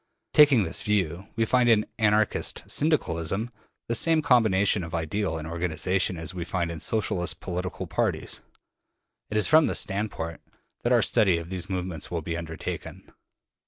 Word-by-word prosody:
Taking 145 Hz, -7 st, +6 dB
this 80 Hz, -, 0 dB
view, 95 Hz, -3 st, -1 dB
we 115 Hz, 0 st, +1 dB
find 125 Hz, +1 st, +3 dB
in 105 Hz, -2 st, +4 dB
Anarchist 105 Hz, -1 st, +1 dB
Syndicalism 110 Hz, -, 0 dB, 0.4 s
the 115 Hz, -, -1 dB
same 155 Hz, +7 st, +3 dB
combination 105 Hz, -7 st, +3 dB
of 85 Hz, +1 st, -5 dB
ideal 85 Hz, +3 st, -2 dB
and 80 Hz, 0 st, -6 dB
organization 90 Hz, +2 st, -1 dB
as 80 Hz, +1 st, -3 dB
we 90 Hz, -2 st, -4 dB
find 85 Hz, 0 st, -2 dB
in 85 Hz, -, -6 dB
Socialist 90 Hz, -7 st, -1 dB
political 90 Hz, 0 st, -4 dB
parties. -, -, -2 dB, 0.9 s
It 105 Hz, -, -1 dB
is 105 Hz, -, +3 dB
from 155 Hz, 0 st, +5 dB
this -, -, +1 dB
standpoint 95 Hz, -5 st, -4 dB, 0.4 s
that -, -, 0 dB
our -, -, +4 dB
study 95 Hz, -5 st, +3 dB
of 85 Hz, +1 st, -7 dB
these 95 Hz, 0 st, -3 dB
movements 90 Hz, -4 st, -4 dB
will 85 Hz, -2 st, -3 dB
be 85 Hz, +1 st, -3 dB
undertaken. 80 Hz, -2 st, -7 dB
95 Hz, 160 wpm, -26 LUFS, 85-110 Hz, 0.9 s, Taking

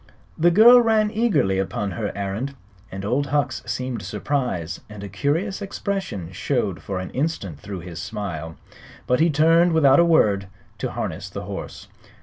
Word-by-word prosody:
The 170 Hz, +2 st, +4 dB
girl 235 Hz, +7 st, +8 dB
ran 220 Hz, -2 st, +2 dB
eagerly 210 Hz, -, +1 dB
upon 100 Hz, +1 st, -2 dB
her 105 Hz, -1 st, -3 dB
errand. 100 Hz, +8 st, -3 dB, 0.5 s
Old 130 Hz, +7 st, 0 dB
Hucks 140 Hz, -2 st, 0 dB
seemed 125 Hz, 0 st, -3 dB
surprised, 125 Hz, -, -2 dB
and 105 Hz, -1 st, -9 dB
a -, -, -5 dB
curious 160 Hz, -, -1 dB
expression 195 Hz, -, -4 dB
showed 95 Hz, -, -1 dB
for 95 Hz, -, -4 dB
an 95 Hz, 0 st, -5 dB
instant 125 Hz, -, -3 dB
through 95 Hz, +2 st, -7 dB
his 85 Hz, -1 st, -7 dB
smile. 80 Hz, -7 st, -5 dB, 0.5 s
But 125 Hz, -, +2 dB
he 165 Hz, +2 st, +4 dB
turned 165 Hz, +3 st, +4 dB
without 145 Hz, -3 st, +5 dB
a -, -, +7 dB
word 105 Hz, -, +3 dB, 0.3 s
to -, -, -2 dB
harness -, -, -4 dB
the -, -, -6 dB
horse. -, -, -7 dB
130 Hz, 155 wpm, -23 LUFS, -, 0.5 s, girl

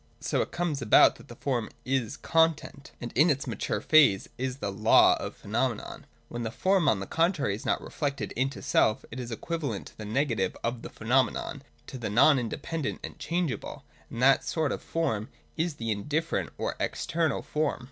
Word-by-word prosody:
So -, -, 0 dB
it -, -, -2 dB
comes 170 Hz, -5 st, -2 dB
about -, -, +6 dB
that -, -, -15 dB
the -, -, -11 dB
form 120 Hz, -5 st, -2 dB, 0.2 s
is 130 Hz, -4 st, -1 dB
Content: 160 Hz, -4 st, 0 dB
and 120 Hz, -, -6 dB
in 150 Hz, +7 st, +5 dB
its 140 Hz, -2 st, 0 dB
mature -, -, -2 dB
phase 150 Hz, -12 st, +5 dB
is 130 Hz, 0 st, -3 dB
the 100 Hz, -7 st, -3 dB
Law 110 Hz, +3 st, +5 dB
of -, -, -5 dB
the -, -, -26 dB
Phenomenon. 115 Hz, +2 st, -2 dB, 0.2 s
When 120 Hz, -, -6 dB
the 115 Hz, -, -2 dB
form, 185 Hz, -, +2 dB
on 105 Hz, -, +2 dB
the 100 Hz, -, -4 dB
contrary, 165 Hz, -, +1 dB
is 105 Hz, -, -6 dB
not -, -, 0 dB
reflected 140 Hz, -2 st, -3 dB
into 135 Hz, +3 st, -2 dB
self, 115 Hz, -6 st, +2 dB
it 125 Hz, -, -6 dB
is 120 Hz, -2 st, -5 dB
equivalent 140 Hz, -1 st, -4 dB
to -, -, -24 dB
the 105 Hz, -, -6 dB
negative 110 Hz, -4 st, 0 dB
of 115 Hz, 0 st, -2 dB
the -, -, -7 dB
phenomenon, 130 Hz, +4 st, 0 dB, 0.2 s
to 130 Hz, -, -8 dB
the 110 Hz, -, -3 dB
non 130 Hz, +7 st, +5 dB
inde 115 Hz, -3 st, -4 dB
pendent 165 Hz, -4 st, -3 dB
and -, -, -8 dB
changeable: 165 Hz, -, -3 dB, 0.3 s
and 115 Hz, -, -4 dB
that 135 Hz, +1 st, +5 dB
sort 155 Hz, -4 st, -1 dB
of -, -, -3 dB
form 115 Hz, -11 st, -2 dB, 0.3 s
is 165 Hz, -1 st, -1 dB
the 115 Hz, -4 st, -3 dB
indifferent 150 Hz, +10 st, -1 dB
or -, -, -2 dB
External 160 Hz, -2 st, -1 dB
Form. 150 Hz, -1 st, -1 dB
135 Hz, 195 wpm, -28 LUFS, 115-155 Hz, 0.3 s, about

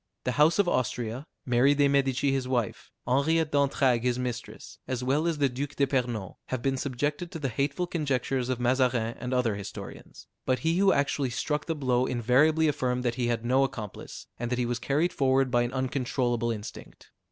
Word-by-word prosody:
The 125 Hz, -, 0 dB
house 150 Hz, +5 st, +4 dB
of 200 Hz, -3 st, +3 dB
Austria, 125 Hz, -1 st, -1 dB, 0.2 s
Mary 130 Hz, +3 st, +4 dB
de 145 Hz, 0 st, +4 dB
Medici 140 Hz, 0 st, +2 dB
his 135 Hz, -1 st, -1 dB
wife, 120 Hz, -4 st, -2 dB, 0.2 s
Henriette 150 Hz, +5 st, +2 dB
d'Entragues 140 Hz, -4 st, +2 dB
his 125 Hz, -1 st, +1 dB
mistress, 125 Hz, -1 st, -6 dB
as 125 Hz, -1 st, -3 dB
well 145 Hz, +6 st, +1 dB
as 165 Hz, -2 st, 0 dB
the 145 Hz, -1 st, +3 dB
Duke 135 Hz, +3 st, -5 dB
d'Epernon, 125 Hz, -8 st, -1 dB
have 130 Hz, -2 st, -3 dB
been 135 Hz, -1 st, +1 dB
subjected 145 Hz, +6 st, -2 dB
to 175 Hz, -, -6 dB
the 140 Hz, -4 st, -2 dB
hateful 140 Hz, +8 st, -1 dB
conjectures 135 Hz, -6 st, -1 dB
of 130 Hz, -2 st, -1 dB
Mazarin 125 Hz, -2 st, +1 dB
and 125 Hz, -, -4 dB
other 125 Hz, -4 st, +1 dB
historians; 100 Hz, -1 st, -9 dB, 0.2 s
but 130 Hz, -, +1 dB
he 165 Hz, +2 st, +2 dB
who 195 Hz, 0 st, +5 dB
actually 140 Hz, -1 st, +1 dB
struck 150 Hz, +4 st, -2 dB
the 165 Hz, -, -1 dB
blow 130 Hz, -3 st, +1 dB
invariably 135 Hz, +7 st, +3 dB
affirmed 125 Hz, -4 st, 0 dB
that 120 Hz, -, +1 dB
he 120 Hz, -1 st, -1 dB
had 120 Hz, -1 st, -1 dB
no 130 Hz, +3 st, +3 dB
accomplice, 110 Hz, -7 st, -6 dB
and 120 Hz, 0 st, -3 dB
that 125 Hz, -, -1 dB
he 125 Hz, -, 0 dB
was 120 Hz, 0 st, -2 dB
carried 145 Hz, +8 st, 0 dB
forward 135 Hz, -1 st, +2 dB
by 120 Hz, -1 st, +3 dB
an 120 Hz, 0 st, -1 dB
uncontrollable 125 Hz, -2 st, -1 dB
instinct. 105 Hz, -2 st, -8 dB
130 Hz, 190 wpm, -28 LUFS, 120-140 Hz, 0.2 s, who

